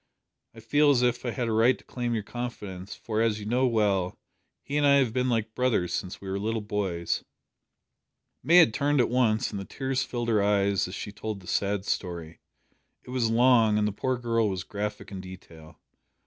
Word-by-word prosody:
I 115 - -11
feel 145 +7 +3
as 130 -3 +4
if 120 0 +1
I - - 0
had 120 0 -2
a - - -1
right 115 +4 +4
to - - -20
claim 120 -2 -3
your 110 - -2
confidence, 105 -5 -6
for, 110 -1 -2
as 110 -2 +1
you 105 - -7
know 125 +4 +2
well, 100 -6 +1 0.5
he 145 - -5
and 150 - +2
I 140 -1 +6
have 130 -5 +2
been 125 0 0
like 110 -2 -1
brothers 115 -9 0
since 90 -2 -4
we 100 - -10
were 95 +1 -2
little 110 +2 -2
boys." 95 -5 -2 1.2
May 170 - +3
had 165 -11 +7
turned 145 +2 +1
at 120 - +3
once, 120 -2 +2
and 100 - -4
the - - -5
tears 135 +5 -2
filled 120 -1 -3
her 110 -3 +3
eyes 100 -1 +2
as 90 - -7
she 105 - -6
told 105 0 -5
the 90 - -16
sad 100 -1 -1
story. 85 -5 -4 0.6
It - - -11
was 125 -3 +1
long, 115 -2 +4
and 105 0 +2
the - - -1
poor 130 +5 -1
girl 115 -2 +1
was 95 -2 -3
graphic 105 +1 -5
in 95 -2 -6
detail. 85 -4 -13
110 Hz, 210 wpm, -27 LUFS, 100-125 Hz, 1.2 s, had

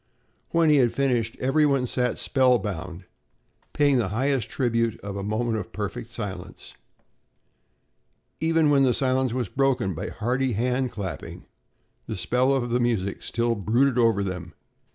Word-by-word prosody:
When 165 -2 +3
he 150 - +5
had 120 -4 +4
finished, 120 -5 0
every 135 +4 +2
one 140 -3 +2
sat 125 0 -1
spellbound, 100 - 0 0.7
paying 145 -3 +3
the 110 - 0
highest 120 +2 0
tribute 115 -3 0
of 100 -1 -6
a 100 - -3
moment 110 +3 -1
of 105 - -6
perfect 105 +2 -5
silence. 95 -6 -7 1.7
Even 160 -2 +2
when 140 -1 +4
the 130 -3 +3
silence 130 -1 +1
was 125 -2 -2
broken 135 -8 0
by 80 - -5
hearty 125 +3 -1
hand 125 +3 0
clapping, 95 -8 -6 0.6
the 110 - -4
spell 125 +7 +1
of 125 -3 0
the 120 - +2
music 110 -5 -1
still 120 0 0
brooded 120 +5 +1
over 115 -4 +3
them. 90 -3 -5
120 Hz, 150 wpm, -25 LUFS, 105-130 Hz, 1.7 s, he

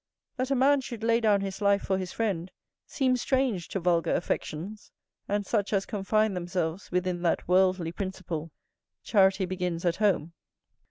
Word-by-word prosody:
That 255 +1 -1
a 275 - +2
man 275 +2 +4
should 235 -3 -7
lay 230 0 +3
down 210 -3 +3
his 195 +1 -5
life 200 0 +3
for 190 0 0
his 185 -2 -4
friend 190 -6 -2 0.4
seems 255 -3 +1
strange 255 - 0
to 195 - -3
vulgar 170 -1 +2
affections 180 +4 -4 0.4
and 205 0 -1
such 205 -1 0
as 195 -1 +1
confine 215 +1 +1
themselves 175 -1 -3
within 180 -1 -1
that 170 -2 0
worldly 185 -2 +3
principle, 175 -4 -5 0.5
"Charity 195 -2 +3
begins 180 -2 -3
at 170 0 +1
home." 185 -6 +1
190 Hz, 160 wpm, -28 LUFS, 180-215 Hz, 0.5 s, man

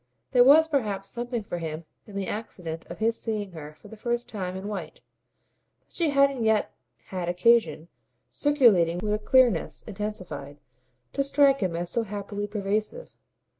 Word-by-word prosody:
There 245 -2 +6
was 305 +5 +7
perhaps 210 -10 -1
something 240 -1 -4
for 175 -3 -5
him 160 0 -5 0.2
in 205 - -12
the 200 -1 -2
accident 180 -7 -5
of - - -7
his 225 +1 0
seeing 210 -4 -3
her 155 -2 -9
for - - -16
the 220 - -11
first 240 +2 -2
time 185 -4 -5
in 190 +2 -6
white, 185 -7 -6 0.8
but - - -29
she 335 -3 +1
hadn't 275 -3 +3
yet 220 -1 +2 0.4
had 180 -2 -3
occasion 180 -4 +3 0.4
circulating 225 - +3
with 210 +3 -1
a 210 - 0
clearness 240 -5 +3
intensified 185 -9 -6 0.5
to 275 - +1
strike 275 0 +4
him 185 -4 -1
as 170 +1 -3
so 235 - +1
happily 205 -1 -5
pervasive. 210 - -3
210 Hz, 165 wpm, -26 LUFS, 180-240 Hz, 0.8 s, was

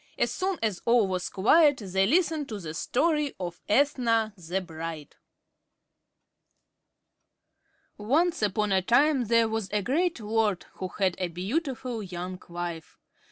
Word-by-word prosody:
As - - 0
soon 380 -1 -1
as 210 -5 -1
all 235 -3 +4
was 185 -1 -2
quiet, 290 - +4
they 190 -2 0
listened 315 - +1
to 215 -2 -5
the 160 -4 -6
story 300 - 0
of 175 -2 -6
"Ethna, 230 -3 +2
the 180 0 -3
Bride." 165 -4 -7 2.8
Once 305 +11 +1
upon 210 0 0
a 190 -1 +3
time 265 +6 +3
there 230 +1 +3
was 220 -3 -3
a 210 -1 0
great 325 - 0
lord, 215 -3 0
who 185 - -3
had 185 0 0
a 180 - 0
beautiful 240 - -3
young 180 -1 -6
wife. 170 -1 -6
215 Hz, 135 wpm, -27 LUFS, 185-270 Hz, 2.8 s, all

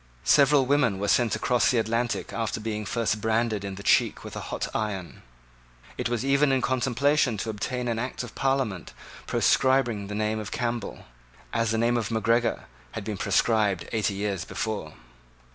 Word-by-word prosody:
Several 140 -1 +5
women 125 -7 +2
were 100 +1 -2
sent 120 +1 +3
across 125 -1 +2
the 125 - +2
Atlantic 115 +2 -1
after 115 -1 -2
being 105 -1 -4
first 110 -2 -1
branded 110 -1 0
in 100 -1 -5
the 100 - -9
cheek - - +2
with - - -8
a - - -4
hot - - -2
iron. 100 -5 -4 0.7
It - - -2
was 120 +1 -1
even 140 +1 +3
in 130 -2 +1
contemplation 130 0 +1
to 110 +2 -3
obtain 125 +4 -3
an 115 -1 -1
act 125 +1 -4
of 125 - -9
Parliament 135 -10 -1 0.3
proscribing 120 -6 +2
the 105 - -5
name 110 +1 -1
of 105 - -5
Campbell, 120 -3 -3 0.5
as 115 -1 +1
the 115 - 0
name 120 +1 +2
of 110 -3 -2
Macgregor 115 +1 +1 0.3
had 110 - -5
been 105 0 -4
proscribed 100 -1 +1
eighty 105 -3 0
years 100 -3 -2
before. 105 -8 -4
115 Hz, 175 wpm, -26 LUFS, 105-125 Hz, 0.7 s, Several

